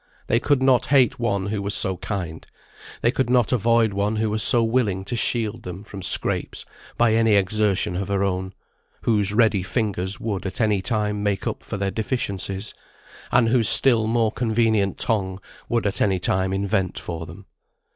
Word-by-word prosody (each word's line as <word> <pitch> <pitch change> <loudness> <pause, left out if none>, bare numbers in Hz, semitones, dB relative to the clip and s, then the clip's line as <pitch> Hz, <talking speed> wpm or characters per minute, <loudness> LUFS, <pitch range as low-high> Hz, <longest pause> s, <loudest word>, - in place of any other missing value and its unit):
They 115 - +1
could 135 +1 +1
not 130 -2 +3
hate 130 -4 +3
one 100 -5 -1
who 100 0 -3
was 100 0 0
so 95 -1 +1
kind; 90 -6 -5 0.6
they 120 - +3
could 130 -1 -1
not 125 -3 +2
avoid 115 -2 +2
one 100 +2 -1
who 110 0 -1
was 110 0 -1
so 120 +2 +4
willing 110 -5 0
to 120 - -3
shield 115 -1 -1
them 90 0 -8
from 100 -2 -9
scrapes 90 - -2 0.3
by 120 -2 +3
any 115 -1 +3
exertion 100 -2 +1
of 95 +2 -3
her 100 -1 0
own; 95 0 -2 0.5
whose 105 -3 +1
ready 105 -3 +2
fingers 95 -2 -2
would 100 -4 -3
at 95 - -7
any 105 -4 +1
time 105 0 -1
make 105 -2 -1
up - - -3
for - - -6
their 100 0 -2
deficiencies, 100 -3 -3 0.6
and 115 -2 +3
whose 115 -3 +4
still 115 -5 +6
more 115 -1 +1
convenient 110 -3 0
tongue 95 -4 0 0.3
would 115 -2 0
at 100 - -2
any 95 -2 +2
time 95 +1 0
invent 95 -1 -1
for 80 -1 -6
them. 90 +3 -12
105 Hz, 180 wpm, -22 LUFS, 95-115 Hz, 0.6 s, still